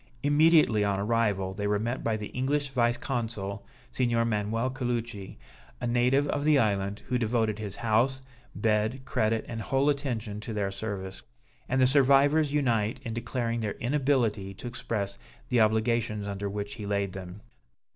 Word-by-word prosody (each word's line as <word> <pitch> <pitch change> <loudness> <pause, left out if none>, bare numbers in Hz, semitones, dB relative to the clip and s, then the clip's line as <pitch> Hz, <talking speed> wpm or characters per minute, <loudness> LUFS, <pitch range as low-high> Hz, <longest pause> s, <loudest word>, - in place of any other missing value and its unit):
Immediately 150 -7 +5
on 100 -1 0
arrival, 100 -3 0
they 105 +1 -2
were 105 0 +2
met 120 +5 -3
by 110 -1 0
the 105 -1 -6
English 140 +3 -1
vice 120 -3 +1
consul, 110 -6 -3 0.3
Signor 120 -2 +1
Manuel 115 +3 0
Caluci, 120 -6 -4 0.4
a - - -3
native 125 +4 +2
of 145 - -1
the 150 -1 +5
island, 100 -4 0
who 125 0 +1
devoted 110 -2 0
his 105 -2 -5
house, 120 +4 +1 0.4
bed, 110 +4 +1
credit 110 -4 0
and 115 -1 -5
whole 135 +6 +2
attention 115 -7 -3
to 110 +1 -6
their 100 -2 -1
service; 95 -2 -5 0.5
and 130 - +1
the 130 - +6
survivors 140 +3 +4
unite 120 -6 +1
in 115 -3 -4
declaring 120 0 -2
their 105 -2 -2
inability 120 -7 0
to - - -10
express 110 -5 -3 0.3
the 120 -2 +3
obligations 110 -1 +1
under 100 0 -3
which 100 0 -4
he 105 - -7
laid 100 -2 -1
them. 95 +1 -8
115 Hz, 160 wpm, -28 LUFS, 105-130 Hz, 0.5 s, the